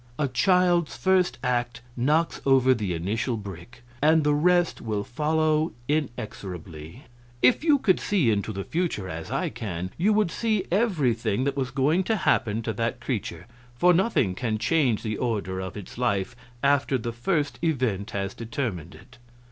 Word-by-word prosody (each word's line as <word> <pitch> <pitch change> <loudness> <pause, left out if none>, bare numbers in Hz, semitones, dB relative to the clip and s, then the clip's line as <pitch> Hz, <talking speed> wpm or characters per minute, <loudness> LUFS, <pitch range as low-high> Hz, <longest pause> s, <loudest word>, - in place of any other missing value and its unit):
A 150 - +1
child's 175 +2 +2
first 185 +7 +2
act 120 -1 -1
knocks 150 +7 +1
over 130 -1 +5
the 105 -7 -2
initial 110 +8 -2
brick, 100 +4 -10 0.2
and 155 +1 +4
the 150 0 +3
rest 175 +3 +2
will 105 -3 -2
follow 155 +4 0
inexorably. 100 - -5 0.4
If 125 - +5
you 305 -3 +5
could 190 -9 +2
see 170 - +2
into 105 +1 -1
the 100 -1 -4
future, 160 - -2
as 80 -2 -6
I - - -1
can, 90 -4 -5
you 200 +5 +3
would 210 -5 +2
see 215 -3 0
everything 140 - +1
that 140 0 -1
was 135 -2 -1
going 150 +9 +2
to 225 - +1
happen 115 - +1
to 110 - -2
that 115 +3 -2
creature; 95 -9 -4 0.3
for 180 +8 +4
nothing 170 - +2
can 110 +1 -2
change 120 0 +1
the 110 -2 -2
order 105 -6 -2
of 95 +1 -6
its 105 +3 -9
life 100 -1 0 0.3
after 140 -1 +3
the 115 -1 -4
first 145 +5 -1
event 120 - 0
has 100 -2 -3
determined 110 - -4
it. 125 +9 -17
125 Hz, 165 wpm, -26 LUFS, 105-160 Hz, 0.4 s, over